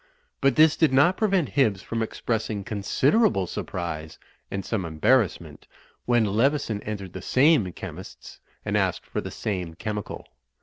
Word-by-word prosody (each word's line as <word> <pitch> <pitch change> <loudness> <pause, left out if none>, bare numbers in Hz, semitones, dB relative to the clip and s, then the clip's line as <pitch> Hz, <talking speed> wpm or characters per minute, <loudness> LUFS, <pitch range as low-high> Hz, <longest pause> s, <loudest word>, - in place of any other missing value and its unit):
But 135 -2 +3
this 155 0 +6
did 160 -5 +3
not 145 +8 +4
prevent 195 -8 +1
Hibbs 110 -9 +1
from 115 0 -3
expressing 110 -2 -2
considerable 110 - +1
surprise 80 -3 -5 0.3
and 95 -1 -4
some 110 -5 -2
em 80 -2 -7
barrassment 115 -3 +1 0.4
when 120 -2 +3
Leveson 115 +1 +1
entered 100 -4 -6
the 95 - -7
same 130 - +3
chemist's 95 0 -10 0.3
and - - -1
asked - - 0
for - - -4
the - - -6
same 90 -6 -4
chemical. 105 +2 -5
110 Hz, 145 wpm, -25 LUFS, 95-135 Hz, 0.4 s, this